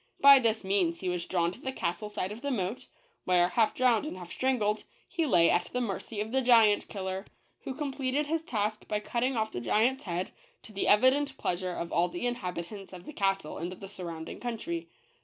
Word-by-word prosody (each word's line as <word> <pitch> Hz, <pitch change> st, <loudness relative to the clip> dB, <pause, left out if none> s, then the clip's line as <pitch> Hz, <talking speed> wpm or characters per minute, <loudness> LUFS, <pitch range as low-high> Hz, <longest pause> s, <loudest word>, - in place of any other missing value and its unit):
By 280 Hz, -1 st, +9 dB
this 225 Hz, -3 st, +1 dB
means 190 Hz, -4 st, +1 dB
he 185 Hz, -, -1 dB
was 180 Hz, -1 st, -3 dB
drawn 170 Hz, -2 st, +1 dB
to 240 Hz, -, -13 dB
the 265 Hz, -, -3 dB
castle 210 Hz, -2 st, -3 dB
side 195 Hz, -2 st, -3 dB
of 220 Hz, +3 st, -8 dB
the 285 Hz, -, -2 dB
moat, 210 Hz, -3 st, -2 dB, 0.4 s
where, 180 Hz, -1 st, +4 dB
half 225 Hz, +1 st, +2 dB
drowned 250 Hz, +1 st, +3 dB
and 245 Hz, -, -6 dB
half 175 Hz, -1 st, -9 dB
strangled, 220 Hz, -5 st, 0 dB, 0.2 s
he 335 Hz, -4 st, -1 dB
lay 175 Hz, -8 st, +5 dB
at 175 Hz, -, +2 dB
the 250 Hz, -, -3 dB
mercy 215 Hz, -1 st, -4 dB
of 215 Hz, +1 st, -3 dB
the 265 Hz, +1 st, +2 dB
Giant 225 Hz, -4 st, +5 dB
Killer, 190 Hz, -1 st, -4 dB, 0.4 s
who 265 Hz, -, -4 dB
com 290 Hz, -2 st, -3 dB
pleted 275 Hz, +2 st, 0 dB
his 320 Hz, +2 st, -1 dB
task 215 Hz, -7 st, -2 dB
by 210 Hz, -, 0 dB
cutting 240 Hz, +4 st, -1 dB
off 220 Hz, 0 st, 0 dB
the 120 Hz, -, -4 dB
giant's 240 Hz, -, +1 dB
head, 180 Hz, 0 st, -3 dB, 0.3 s
to 215 Hz, -, -12 dB
the 200 Hz, -, -1 dB
evident 265 Hz, +5 st, +4 dB
pleasure 180 Hz, 0 st, -2 dB
of 170 Hz, -1 st, -5 dB
all 175 Hz, +1 st, +3 dB
the 175 Hz, +7 st, -4 dB
inhabitants 195 Hz, -4 st, -4 dB
of 180 Hz, -1 st, -10 dB
the 305 Hz, -, -8 dB
castle 195 Hz, -, -1 dB
and 175 Hz, +2 st, -4 dB
the 195 Hz, +1 st, -9 dB
surroun 170 Hz, -4 st, -7 dB
ding -, -, -8 dB
country. 335 Hz, +9 st, -4 dB
210 Hz, 215 wpm, -29 LUFS, 180-255 Hz, 0.4 s, By